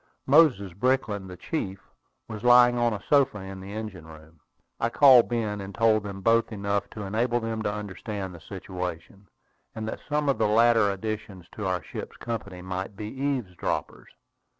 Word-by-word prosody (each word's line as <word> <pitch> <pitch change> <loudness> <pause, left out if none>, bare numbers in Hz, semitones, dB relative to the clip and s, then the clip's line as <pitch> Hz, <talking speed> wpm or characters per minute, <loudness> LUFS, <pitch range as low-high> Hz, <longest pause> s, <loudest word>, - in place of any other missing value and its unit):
Moses 130 - +4
Brickland, 105 -3 0
the 90 - -9
chief, 95 - -4 0.5
was 110 -2 -7
lying 120 0 +7
on 120 -1 +2
a 105 - -5
sofa 140 -6 +3
in 95 -1 -8
the 95 +1 -9
engine 105 -6 -7
room. 80 0 -15 0.4
I 115 - +1
called 130 -2 +7
Ben, 110 -4 -2
and 95 0 -8
told 110 -1 +3
them 100 -1 -7
both 115 +3 +3
enough 100 -1 -2
to 105 - -6
enable 115 +5 0
them 115 -1 -3
to 105 - -1
understand 105 -1 -5
the 85 - -12
situation, 90 +1 -7 0.5
and 110 0 -4
that - - -4
some 150 0 0
of 140 - +1
the - - +3
later 115 -1 +4
additions 105 -2 -5
to 105 -3 -4
our 90 -2 -1
ship's - - -8
company 100 -6 -6
might 95 +2 -5
be 105 +1 -6
eavesdroppers. 130 -8 -3
105 Hz, 175 wpm, -26 LUFS, 95-115 Hz, 0.5 s, lying